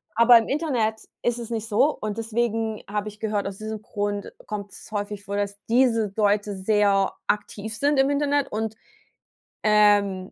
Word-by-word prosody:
Aber 235 +1 +8
im 225 - +1
Internet 245 -8 0 0.2
ist 240 0 0
es 235 -1 -6
nicht 225 -1 -3
so 230 +8 +3
und 215 0 -4
deswegen 225 -1 -1
habe 210 +1 -2
ich 210 0 -15
gehört, 210 -2 -1
aus 195 -1 -6
diesem 215 0 -6
Grund 205 -1 -3 0.2
kommt's 205 -2 -7
häufig 205 -1 -4
vor, 200 - -4
dass 200 0 -2
diese 230 -4 +2
Leute 205 -1 +1
sehr 200 0 +2 0.2
aktiv 210 +1 -2
sind 285 +4 +2
im 270 +1 +4
Internet 285 -1 +1
und, 220 0 -3 0.9
ähm, 205 -3 +3
215 Hz, 165 wpm, -24 LUFS, 205-230 Hz, 0.9 s, Aber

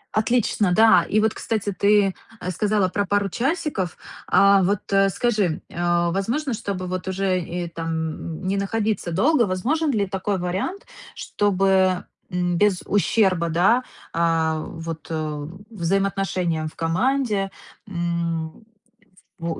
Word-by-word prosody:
Отлично, 215 -3 +2
да. 215 -4 +6
И 215 - +3
вот, 220 0 +2
кстати, 210 -2 -2
ты 200 0 +3 0.4
сказала 205 +1 +1
про 200 +2 -1
пару 205 0 +1
часиков. 270 - -2 0.3
А, 200 0 +5
вот 200 +2 +1 0.3
скажи, 210 -7 0
э, 175 0 +1
возможно, 240 - -1
чтобы, 195 -4 -4
вот, 185 0 -4
уже 185 -2 -1
там, 160 +1 -4
не 195 +1 0
находиться 205 -2 -1
долго, 280 - +3
возможен 270 - 0
ли 205 -5 +1
такой 195 +1 -2
вариант, 190 - -3 0.3
чтобы, 190 -2 +1 0.3
м, 175 -1 0
без 205 -1 +2
ущерба, 190 -4 +2
да, 195 +10 +3 0.3
э, 165 -1 +1
вот, 165 -1 -7
э, 155 -2 -3 0.2
взаимоотношениям 185 -4 -1
в - - -10
команде, 200 +4 0 0.4
м, 170 0 -3 0.7
во 165 -1 -3
190 Hz, 120 wpm, -23 LUFS, 170-210 Hz, 0.7 s, да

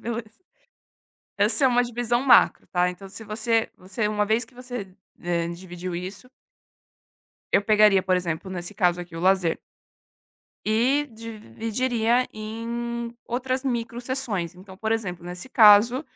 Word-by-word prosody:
Beleza. 225 - -6 1.0
Essa 285 - +2
é - - +7
uma 245 0 +3
divisão 240 0 -1
macro, 255 -3 +5
tá? 180 0 +1
Então 195 +2 -10
se 200 +4 -9
você 225 +1 0
você, 190 +4 -3
uma 210 0 +1
vez 220 +3 +1
que 230 - -24
você, 245 -7 -7 0.3
eh, 170 -1 -1
dividiu 175 +1 -7
isso 190 +7 -7 1.2
eu - - +4
pegaria, 210 -2 +5
por 185 0 +2
exemplo, 175 +1 -3
nesse 180 +2 -5
caso 180 -3 +2
aqui, 175 -1 -9
o - - -5
lazer 185 -2 +2 1.1
e 245 +7 +2
dividiria 230 - -1
em 235 +2 -5
outras 255 +2 -2
microsseções. 235 - -2
Então, 190 +1 -13
por 220 +1 -1
exemplo, 185 -6 -3
nesse 180 +4 -7
caso: 230 +3 +6
215 Hz, 135 wpm, -25 LUFS, 185-235 Hz, 1.2 s, é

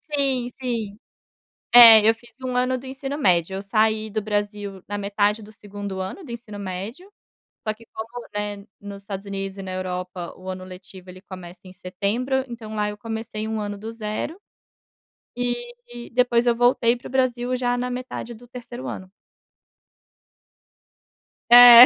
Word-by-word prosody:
Sim, 265 -3 +1
sim. 230 -5 -4 0.8
É, 225 -3 +11
eu 225 - +6
fiz 240 +2 -20
1 255 -1 -3
ano 255 +1 +2
do 260 - -10
ensino 270 +2 -4
médio, 185 - +3
eu 195 - -3
saí 215 +2 +1
do 215 +1 -2
Brasil 205 -2 -3
na 205 - -3
metade 205 +1 +1
do 215 - -12
2º 205 -2 -7
ano 190 - -5
do 250 - -9
ensino 225 -3 -7
médio, 200 - -6 0.6
só 215 - +2
que 225 +2 -16
como, 235 +2 -7
né, 205 0 -3
nos 200 -1 -9
Estados 195 -1 -6
Unidos 195 -1 -4
e 195 - -6
na 185 - -5
Europa 180 -1 -4
o 185 +1 -7
ano 185 0 -5
letivo 185 0 -11
ele 185 +1 -11
começa 185 -2 -10
em 185 - -11
setembro, 220 +9 -1
então 225 -3 -8
lá 210 -1 0
eu 210 - -9
comecei 220 -1 -4
1 220 - -2
ano 205 -1 -4
do 220 +2 -6
zero, 225 - -4 1.0
eh, 240 0 -4
depois 245 -1 +3
eu 240 - +5
voltei 245 0 +4
para 245 - -10
o - - -11
Brasil, 255 -1 +1
já 245 -1 +1
na 250 0 -2
metade 250 -1 -5
do 235 +2 -13
3º 245 +1 -8
ano. 185 0 -6 2.4
É. 245 0 +12
220 Hz, 170 wpm, -24 LUFS, 200-245 Hz, 2.4 s, É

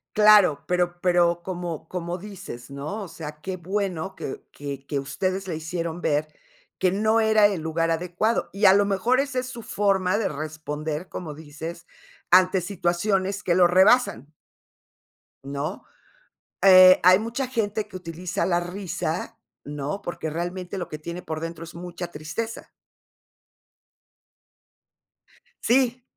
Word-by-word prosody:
Claro, 210 -7 +6
pero 175 -1 0
pero 175 -1 +3
como 175 -4 -5
como 175 0 -4
dices, 185 -11 -9
¿no?, 145 +10 -5
o 195 - -6
sea, 150 -2 -9
qué 190 +1 -4
bueno 190 0 -3
que - - -6
que 140 -1 -7
que 140 0 -2
ustedes 185 +7 -2
le 170 - -3
hicieron 165 +1 -4
ver 150 -1 +1 0.5
que 185 - +2
no 215 +3 +2
era 220 -2 +5
el 195 -5 -3
lugar 165 +1 -1
adecuado, 180 +7 0
y 200 +2 +1
a 190 - +9
lo 205 0 +4
mejor 200 +6 +2
esa 275 -2 0
es 255 - -4
su 235 -2 -8
forma 195 -1 +1
de - - 0
responder, 155 +2 -5
como 160 -4 -6
dices, 160 +3 -8 0.4
ante 185 +1 +5
situaciones 190 +2 -1
que 175 -4 +1
lo 180 -1 +6
rebasan. 180 - +4 1.1
¿No?, 140 +6 -4 0.8
eh, 185 -1 +9
hay 185 +2 +7
mucha 230 +4 -3
gente 215 -4 -2
que 205 - -14
utiliza 180 0 -3
la 175 -2 +2
risa, 180 +1 -4 0.2
¿no?, 145 +6 -4
porque 170 -4 -4
realmente 175 +4 -4
lo 180 - -5
que 155 - -6
tiene 170 +3 -6
por 160 -3 -5
dentro 165 +1 -6
es 165 - -10
mucha 175 +1 -6
tristeza. 175 +10 -5 3.0
Si, 250 0 +2
180 Hz, 140 wpm, -25 LUFS, 160-200 Hz, 3.0 s, a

